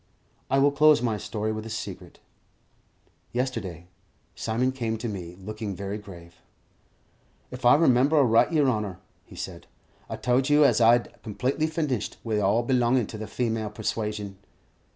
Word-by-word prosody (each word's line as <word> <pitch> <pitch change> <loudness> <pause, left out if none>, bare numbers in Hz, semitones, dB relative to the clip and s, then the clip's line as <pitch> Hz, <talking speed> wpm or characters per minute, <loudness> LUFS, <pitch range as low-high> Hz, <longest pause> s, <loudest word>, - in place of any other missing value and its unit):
I 135 - +2
will 140 +1 +4
close 150 0 +5
my 115 -3 -1
story 110 +1 -3
with 110 0 -4
a 115 - -8
secret. 110 - -7 1.2
Yesterday, 115 -10 -3 0.5
Simon 120 +4 -1
came 115 -4 -3
to 120 +2 -4
me, 90 -5 -6
looking 105 +1 -6
very 100 +2 -5
grave. 85 -4 -13 1.1
"If 125 0 -7
I 120 - +8
remember 140 -1 +4
aright, 120 -2 +4
yer 155 -3 +3
honour," 105 -7 -1 0.3
he - - -14
said, - - -7 0.4
"I - - -3
told 130 +2 +1
you 145 0 +6
as 120 -4 +3
'ow 115 - +7
I'd 120 -1 +1
completely 130 +8 -1
finished 150 - -2
wi' 110 -2 -1
all 105 +4 +2
belongin' 125 -1 +2
to 110 - -7
the 110 - -5
female 110 -1 -2
persuasion." 105 -2 -4
115 Hz, 155 wpm, -26 LUFS, 105-130 Hz, 1.2 s, I